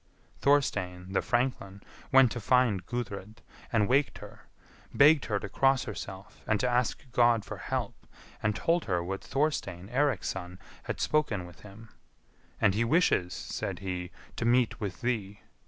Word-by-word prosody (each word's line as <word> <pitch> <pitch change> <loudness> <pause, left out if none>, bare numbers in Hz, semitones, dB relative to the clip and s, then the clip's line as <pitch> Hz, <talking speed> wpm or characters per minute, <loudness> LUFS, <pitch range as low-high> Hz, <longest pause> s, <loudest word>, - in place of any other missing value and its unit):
Thorstein, 95 -10 +1
the - - +2
franklin, 120 -6 -1 0.3
went 130 -3 +6
to 120 - -3
find 115 -4 +2
Gudrid, 110 -3 -5 0.3
and 110 -3 +2
waked 140 +3 +2
her; - - -13 0.4
begged 150 0 +5
her 105 -3 -1
to 100 - -6
cross 135 +5 +2
herself, 100 -2 -8
and 110 -2 +2
to 125 - +1
ask 125 +2 0
God 120 -3 +3
for - - -7
help, - - -4 0.3
and 105 -1 0
told 170 +6 +1
her 90 -4 0
what 95 +2 -4
Thorstein, 105 - -2
Eirik's 135 -4 +1
son, 90 -1 -6 0.3
had - - -4
spoken 115 -12 0
with 85 -1 -14
him; 105 +3 -13 0.7
"and 95 - +4
he 110 +4 +1
wishes," 115 - +2
said - - -4
he, 90 -2 -4 0.3
"to - - -2
meet 120 0 +2
with 95 -3 -5
thee. 105 -5 -2
110 Hz, 155 wpm, -29 LUFS, 95-125 Hz, 0.7 s, went